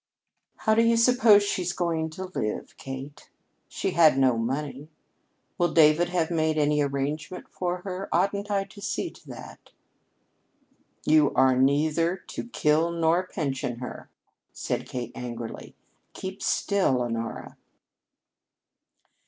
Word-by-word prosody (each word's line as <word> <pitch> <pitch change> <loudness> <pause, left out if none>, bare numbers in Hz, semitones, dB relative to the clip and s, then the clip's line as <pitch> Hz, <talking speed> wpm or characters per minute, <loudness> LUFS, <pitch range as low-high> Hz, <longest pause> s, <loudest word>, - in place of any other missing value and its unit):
"How 220 - +1
do 225 - +4
you 230 0 +3
suppose 230 -3 +6
she's 180 -3 -1
going 165 -2 -1
to 190 - -4
live, 110 -13 -4
Kate? 135 +3 -8 0.4
She - - -3
had 155 -5 +5
no 130 -3 +4
money. 135 +5 -3 0.7
Will 175 -2 +2
David 155 +2 +5
have 175 -2 0
made 160 -1 +1
any 150 0 +2
arrangement 145 +5 -3
for 180 0 -4
her? 190 0 -5
Oughtn't 200 +4 0
I 200 -1 +1
to 200 +1 -14
see 205 - -3
to - - -19
that?" - - -11 1.4
"You 155 -2 +4
are 130 -1 +4
neither 155 +6 +2
to 235 - -8
kill 155 -3 +2
nor 170 +2 +1
pension 135 -8 -3
her," 125 +1 -8 0.4
said - - -4
Kate 120 -2 -5
angrily. 120 -2 -7 0.4
"Keep 190 +1 -7
still, 185 -11 +1
Honora." 115 -1 -5
160 Hz, 130 wpm, -26 LUFS, 135-185 Hz, 1.4 s, suppose